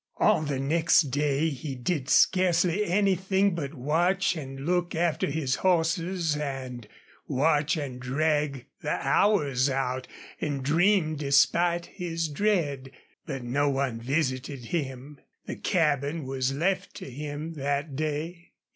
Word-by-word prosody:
All - - +3
the 145 -3 -2
next 160 0 +3
day 145 +3 +1
he 140 -1 -5
did 135 +2 -2
scarcely 180 +1 +3
anything 190 +1 +2
but 160 -3 -4
watch 170 +9 +1
and 135 -3 -7
look 175 0 0
after 165 -1 +1
his 140 -3 -1
horses 170 -2 +1
and 130 -5 -5 0.4
watch 150 +3 +2
and 135 -4 -5
drag 145 +1 0 0.2
the - - -1
hours 145 -11 +3
out 130 -1 -2 0.3
and 145 -3 -2
dream 165 +1 +3
despite 170 +5 +3
his 165 -3 -3
dread. 145 -6 0 0.4
But 135 -5 -4
no 140 +4 +1
one 135 -4 -1
visited 130 -1 -2
him. 140 -2 -4 0.3
The - - -6
cabin 150 -4 0
was 130 0 -1
left 185 +6 -1
to - - -8
him 150 +4 -5
that 140 0 -2
day. 155 +4 -4
150 Hz, 130 wpm, -27 LUFS, 135-170 Hz, 0.4 s, All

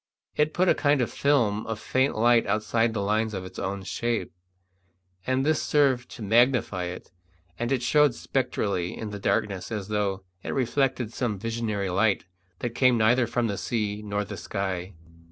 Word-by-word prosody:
It 150 +1 +1
put 185 +1 +3
a - - +6
kind 145 -1 +2
of 120 - 0
film 115 -7 +1
of 110 -1 -3
faint 130 0 +1
light 120 +1 +4
outside 110 +2 +1
the 100 - -1
lines 110 +1 0
of 95 -1 -5
its 95 - -9
own 100 0 -3
shape, 120 +4 -2 1.0
and 130 +1 +1
this 155 0 +2
served 135 -4 +2
to 115 - -8
magnify 115 -4 +3
it, 90 +1 -7 0.5
and 120 +2 -1
it 130 -3 +1
showed 145 0 +4
spectrally 105 -10 -1
in 110 -2 -5
the 105 - -6
darkness 100 +1 -1
as 105 -2 -4
though 100 -2 -1 0.2
it - - -4
reflected 130 -2 0
some 115 -5 -1
visionary 110 -3 -2
light 100 +2 +2 0.4
that 120 -1 -2
came 125 -1 +4
neither 120 +2 +3
from 120 +1 0
the 100 -3 -2
sea 105 -3 -2
nor 105 0 -2
the - - -7
sky. 95 -2 -3
110 Hz, 175 wpm, -26 LUFS, 100-125 Hz, 1.0 s, a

